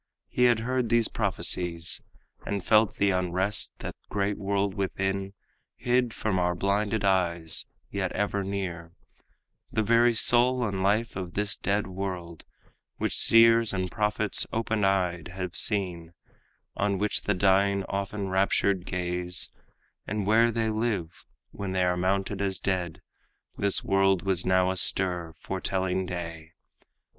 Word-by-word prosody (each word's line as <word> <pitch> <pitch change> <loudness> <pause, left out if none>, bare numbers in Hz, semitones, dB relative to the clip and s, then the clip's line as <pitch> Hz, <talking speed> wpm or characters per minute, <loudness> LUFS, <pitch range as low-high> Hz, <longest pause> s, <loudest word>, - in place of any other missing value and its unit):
He 125 - +2
had 120 -2 +3
heard 125 0 -1
these 115 -1 +3
prophecies, 85 -2 0 0.4
And 100 -3 -4
felt 110 -1 +4
the 100 -1 +2
unrest 90 +2 -1
in - - -12
that - - -5
great 100 0 -1
world 100 0 -1
within, 95 0 -2 0.4
Hid 125 -1 +1
from 105 -4 -1
our 90 0 +1
blinded 100 +3 0
eyes, 85 -4 0 0.2
yet 95 -2 -2
ever 100 0 -1
near, 90 -4 -5 0.8
The 110 - 0
very 115 +2 +4
soul 120 +2 +4
and 95 -2 -3
life 105 +4 +1
of 90 -2 -6
this 105 0 0
dead 100 +1 -1
world, 90 -3 -6 0.5
Which - - -1
seers 115 -1 +5
and 95 -1 -2
prophets 105 -1 +1
open 110 -1 -1
eyed 90 -4 0
have 90 -2 -5
seen, 90 -5 0 0.6
On 100 -1 0
which 105 +2 -1
the 105 - +1
dying 100 +1 +2
often 100 0 -3
raptured 95 0 +1
gaze, 90 -1 -1 0.6
And 105 0 -2
where 115 +3 +4
they 110 -1 -1
live 110 -7 -3 0.3
when 100 -2 -5
they 95 -1 +1
are 90 0 +2
mourned 95 +2 -1
as 95 -2 -1
dead. 90 -2 -3 0.5
This 100 -1 +1
world 95 -1 +2
was 95 -2 -1
now 95 0 +3
astir, 90 -2 0
foretelling 95 -1 -2
day. 85 -2 -7
95 Hz, 140 wpm, -27 LUFS, 90-105 Hz, 0.8 s, seers